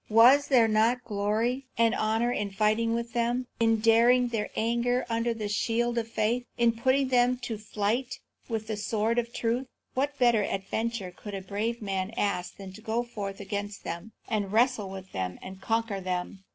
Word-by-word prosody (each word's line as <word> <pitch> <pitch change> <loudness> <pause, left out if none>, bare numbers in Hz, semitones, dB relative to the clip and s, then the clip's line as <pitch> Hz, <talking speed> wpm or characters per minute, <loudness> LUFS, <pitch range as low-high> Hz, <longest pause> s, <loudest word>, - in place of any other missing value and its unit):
Was 245 +6 +7
there 245 -5 +5
not 225 +3 +2
glory 225 +5 -1
and 230 -1 +4
honour 225 +3 +1
in 210 -4 -1
fighting 215 +3 +1
with 235 0 -4
them, 240 +1 0
in 225 -1 +3
daring 240 +2 +5
their 225 -3 -2
anger 235 +2 +1
under 230 +1 +1
the 220 -2 -3
shield 235 +3 0
of 225 - -4
faith, 230 +2 0
in 235 -1 +4
putting 260 +4 +1
them 250 0 +3
to 225 -3 -4
flight 215 +4 -1 0.3
with 220 -2 -2
the 215 -1 -3
sword 220 +2 0
of 235 0 -3
truth? 240 +3 -1 0.3
What 280 +2 -1
better 240 -4 +4
adventure 200 0 -2
could 205 -2 -7
a 195 - -4
brave 220 +4 -3
man 195 +1 -2
ask 190 -3 -1
than 195 -1 -9
to 215 - -12
go 225 +2 -1
forth 200 -5 -6
against 205 0 -5
them, 170 +6 -6
and 205 -4 -1
wrestle 230 -2 +2
with 190 0 -9
them, 90 -1 -3
and 190 0 -9
conquer 225 -2 -1
them? 185 +1 -4
225 Hz, 180 wpm, -28 LUFS, 205-240 Hz, 0.3 s, Was